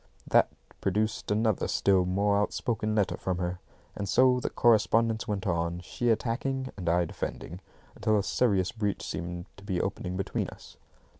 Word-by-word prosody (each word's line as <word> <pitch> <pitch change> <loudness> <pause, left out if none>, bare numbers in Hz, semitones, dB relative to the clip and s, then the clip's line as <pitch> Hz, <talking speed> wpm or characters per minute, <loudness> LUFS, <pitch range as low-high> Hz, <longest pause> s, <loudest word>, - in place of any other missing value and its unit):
That - - +4 0.3
produced 110 0 0
another 110 0 +1
still 95 -2 +3
more 100 +3 +2
outspoken 110 +1 -1
letter 105 -3 +1
from 95 -1 -2
her; 90 0 -2 0.4
and 100 -1 -4
so 130 +2 +5
the - - -2
correspondence 115 0 +3
went 100 -3 -2
on, 85 -1 0
she 120 +6 -2
attacking 130 +4 -1
and 90 -4 -2
I 85 +1 +3
defending, 85 +2 -6 0.3
until 110 -1 +2
a 100 - +1
serious 100 -5 +1
breach 105 -3 -2
seemed 85 +1 -5
to 100 - -14
be 95 -4 -1
opening 95 -1 -3
between 95 - -2
us. - - -14
100 Hz, 160 wpm, -29 LUFS, 90-110 Hz, 0.4 s, so